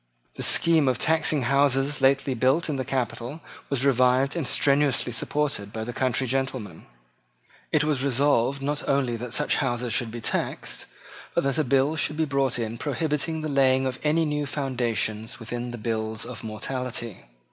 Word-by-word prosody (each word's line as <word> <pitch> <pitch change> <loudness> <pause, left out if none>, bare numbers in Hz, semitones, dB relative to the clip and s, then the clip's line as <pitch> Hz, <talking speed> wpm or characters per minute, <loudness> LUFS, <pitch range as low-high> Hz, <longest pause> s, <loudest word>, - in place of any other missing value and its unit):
The - - -7
scheme 165 -4 +4
of 130 -2 +2
taxing 155 -2 +2
houses 140 +1 +2
lately 135 0 +3
built 130 +7 +2
in 145 - -1
the 130 - -1
capital 125 +2 -3 0.3
was 140 -1 0
revived 130 +1 +3
and 160 -6 -1
strenuously 140 -2 +3
supported 125 -4 -1
by 110 0 -4
the 120 +2 -5
country 130 0 0
gentlemen. 130 -8 -3 0.8
It 150 - +3
was 150 -4 0
resolved 140 0 +2
not 145 +1 -1
only 135 -4 +1
that 120 +1 -6
such 150 +5 +1
houses 120 -4 -1
should 120 -1 +1
be 120 +1 -6
taxed, 115 - -3 0.5
but - - +2
that 140 +3 0
a - - +3
bill 135 +3 +2
should 150 0 0
be 160 - +2
brought 140 -3 +1
in 115 -1 -4
prohibiting 150 +3 -1
the 155 - -3
laying 135 -2 +3
of 130 -1 -3
any 160 +2 +2
new 150 -1 -1
foundations 120 -6 -2
within 120 +1 -5
the 120 - -6
bills 110 0 -2
of 120 -4 -8
mortality. 115 0 -4
130 Hz, 170 wpm, -25 LUFS, 120-145 Hz, 0.8 s, scheme